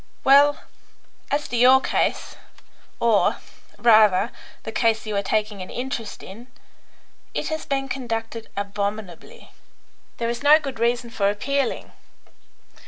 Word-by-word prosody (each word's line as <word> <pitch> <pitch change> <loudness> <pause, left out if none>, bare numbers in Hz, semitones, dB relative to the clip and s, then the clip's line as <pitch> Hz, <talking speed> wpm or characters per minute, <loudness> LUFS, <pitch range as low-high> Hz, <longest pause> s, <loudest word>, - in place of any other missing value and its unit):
Well, 285 +2 +5 0.7
as 290 +1 -1
to - - -3
your 255 +2 +6
case, - - -1 0.6
or, 230 -3 +3 0.4
rather, 215 -2 +4 0.3
the 220 - -6
case 225 0 +1
you 215 -1 -4
are 200 - +1
taking 210 0 -2
an 185 - -8
interest 245 -3 -5
in. 225 +6 -11 0.9
It - - -2
has 315 -1 -4
been 270 -1 -1
conducted 230 -3 -5
abominably. 200 - -5 0.7
There 230 - -2
is 235 0 -3
no 295 +2 +7
good 275 -6 -6
reason 235 0 0
for 200 -3 +1
appealing. 265 +6 -2
230 Hz, 125 wpm, -23 LUFS, 210-265 Hz, 0.9 s, no